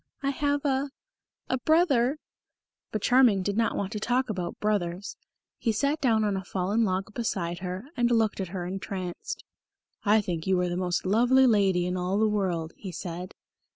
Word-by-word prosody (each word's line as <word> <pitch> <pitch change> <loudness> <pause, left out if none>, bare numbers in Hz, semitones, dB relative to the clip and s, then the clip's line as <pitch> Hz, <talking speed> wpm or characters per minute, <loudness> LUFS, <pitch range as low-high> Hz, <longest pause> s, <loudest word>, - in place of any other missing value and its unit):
I 275 - +1
have 285 +1 -1
a 275 0 +1 0.6
a 260 - 0
brother 285 -3 +3 0.4
" - - -64
But 215 - -3
Charming 245 -7 +5
did 200 +1 -1
not 230 +1 +1
want 200 0 -2
to 215 - -3
talk 245 +2 0
about 180 -4 -4
brothers. 200 -3 -1 0.4
He 230 - +1
sat 280 +8 0
down 225 -5 +3
on 205 -2 +1
a 190 - -3
fallen 195 +5 0
log 195 0 -1
beside 175 -7 -2
her, 185 +4 -5
and 240 -1 +2
looked 225 -4 +2
at 190 - -2
her 180 0 -5
entranced. 185 -1 -5 0.6
"I 210 +1 +5
think 175 -5 -3
you 190 -1 +3
are 180 - 0
the 175 - -2
most 180 -1 -1
lovely 245 +7 +4
lady 195 -6 +3
in 180 +1 -1
all 180 +2 0
the 220 +1 +3
world," 180 -6 -1
he 190 - -7
said. 175 +2 -6
205 Hz, 190 wpm, -27 LUFS, 185-240 Hz, 0.6 s, Charming